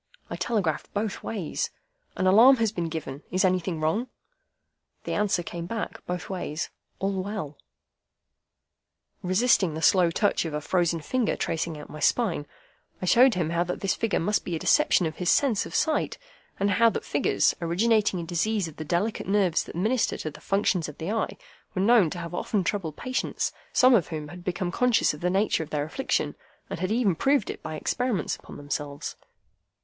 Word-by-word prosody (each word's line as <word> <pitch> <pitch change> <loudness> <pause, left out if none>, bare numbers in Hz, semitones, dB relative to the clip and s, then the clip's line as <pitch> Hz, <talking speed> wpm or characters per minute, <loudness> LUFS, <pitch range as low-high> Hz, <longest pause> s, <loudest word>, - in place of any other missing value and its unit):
I - - -2
telegraphed 195 -10 -1
both 205 0 -2
ways, 195 -8 -3 0.5
'An 185 - 0
alarm 225 +8 +8
has 225 -3 +1
been 175 -5 -3
given. 150 -3 -5
Is 185 +1 +2
anything 180 -2 0
wrong?' 160 +11 0 1.0
The - - -3
answer 205 -4 +1
came 170 0 -6
back, 225 +2 -5
both 180 0 -3
ways, 170 -4 -4 0.3
'All 195 -1 -1
well.'" 185 -7 -5 1.6
Resisting 185 -3 +2
the 160 - -4
slow 180 -3 +5
touch 205 +5 +1
of 160 -3 -4
a - - 0
frozen 170 +1 0
finger 245 +7 0
tracing 160 0 -2
out 150 - -9
my 155 - -9
spine, 175 -7 +1 0.5
I - - -3
showed 245 +6 +6
him 165 -3 -1
how 170 +1 +2
that 180 - -4
this 195 - +1
figure 225 -2 0
must 205 +5 0
be 175 - -3
a - - -1
deception 195 - +3
of 160 - -4
his 180 -1 0
sense 250 -8 +3
of - - -8
sight; 310 -1 +1 0.4
and 200 +1 +2
how 230 +4 +5
that - - -4
figures, - - +2
originating 205 +4 +2
in 170 - -4
disease 185 +3 0
of 160 - -11
the 155 - -4
delicate 175 +8 -1
nerves 195 -4 +2
that - - -10
minister 215 +7 +1
to 155 - -4
the - - -14
functions 195 -5 +1
of 150 - -11
the 165 +5 -3
eye, 225 - -2 0.4
were 185 - 0
known 215 -5 +5
to 175 - -6
have 170 0 -6
often 195 +2 -1
troubled 170 -5 -2
patients, 255 0 -2 0.2
some 255 0 +5
of 190 -10 +4
whom 155 -3 -5
had 175 +2 -10
become 180 0 -2
conscious 250 -2 +3
of 150 - -10
the 180 - +1
nature 195 -1 +1
of 155 - -6
their 145 -2 -1
affliction, 265 - -1 0.4
and - - -4
had 185 - -1
even 220 -4 +2
proved 270 - +1
it - - -10
by 155 - -5
experiments 230 - -1
upon - - -12
themselves. 145 0 -4
185 Hz, 190 wpm, -26 LUFS, 165-215 Hz, 1.6 s, alarm